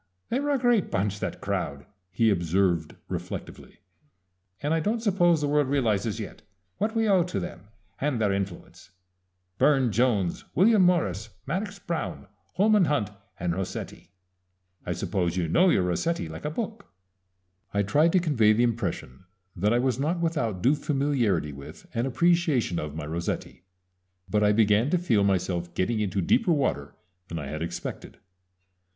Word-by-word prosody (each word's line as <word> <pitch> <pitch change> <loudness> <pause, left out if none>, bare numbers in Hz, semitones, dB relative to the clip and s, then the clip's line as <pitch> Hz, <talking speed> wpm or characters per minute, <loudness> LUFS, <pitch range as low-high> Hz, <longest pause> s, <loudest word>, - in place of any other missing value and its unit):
"They 245 - 0
were 290 +1 -2
a 285 - +3
great 240 -5 +2
bunch, 100 +1 -1
that - - -4
crowd," 70 0 -3 0.2
he 110 +4 +2
observed 85 -2 +1
reflectively, - - -7 0.8
"and 145 +2 -1
I 165 - +2
don't 215 +8 0
suppose 175 -7 +3
the 145 - 0
world 145 -1 +2
realizes 115 -5 0
yet 105 - -7 0.4
what 215 +3 -1
we 225 -1 +2
owe 195 -3 +5
to 180 - -3
them 90 +1 -7 0.3
and 140 -4 0
their 105 -3 +2
influence. 100 -3 -5 0.7
Burne 135 -5 +4
Jones, 105 -6 +1
William 210 +2 +5
Morris, 115 - +2 0.2
Madox 200 +7 -3
Brown, 170 - -4 0.3
Holman 210 -1 +4
Hunt, 110 -10 0 0.3
and 85 -1 -1
Rossetti 95 +1 -5 0.8
I - - 0
suppose 90 -2 -1
you 85 -2 0
know 180 - +4
your 95 - +3
Rossetti 90 - -1
like 80 +1 -8
a - - 0
book?" 215 +5 -5 0.8
I 100 0 +1
tried 150 +11 +3
to 185 - +5
convey 125 -11 +3
the 115 +3 +2
impression 95 - -3 0.3
that 100 +4 +1
I 120 - +3
was 125 0 0
not 160 +5 0
without 120 - -1
due 130 - +5
familiarity 135 - 0
with 70 +1 -11
and 115 +3 0
appreciation 160 - +2
of 75 -1 -5
my 80 -2 -5
Rossetti; 85 +3 -4 0.7
but 105 0 +1
I 105 - +5
began 105 +3 +3
to 180 - +2
feel 120 - +2
myself 90 -3 0
getting 110 +4 0
into 100 -2 -1
deeper 180 - +3
water 130 - -1 0.3
than 85 - -5
I 75 - -4
had 75 +2 -5
expected. 85 +1 -6
115 Hz, 160 wpm, -26 LUFS, -, 0.8 s, owe